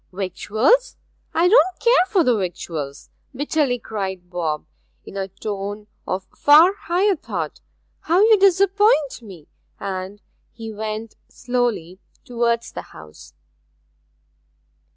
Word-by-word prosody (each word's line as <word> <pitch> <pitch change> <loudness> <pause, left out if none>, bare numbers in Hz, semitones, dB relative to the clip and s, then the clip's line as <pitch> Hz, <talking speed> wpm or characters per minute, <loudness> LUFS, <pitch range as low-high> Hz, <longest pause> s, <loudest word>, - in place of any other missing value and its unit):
'Victuals 215 - +1 0.3
I 340 +2 +3
don't 370 -3 +4
care 470 -6 +4
for 380 -4 +2
the 250 -5 +3
victuals!' 165 -7 -5 0.2
bitterly 290 -2 0
cried 190 -5 -6
Bob, 160 -4 -2 0.4
in - - -11
a 195 -1 -3
tone 205 +1 -6 0.2
of 185 0 -3
far 315 +6 +6
higher 390 +1 +1
thought. 185 - -5 0.4
'How 340 +3 +1
you 435 -1 +6
disappoint 390 - +3
me!' 185 -9 -13 0.3
and 195 +1 -5 0.3
he 225 -1 -8
went 215 +1 -5
slowly 240 -8 -2 0.3
towards 235 -1 -1
the - - -6
house. 75 -1 -15
225 Hz, 110 wpm, -21 LUFS, -, 0.4 s, far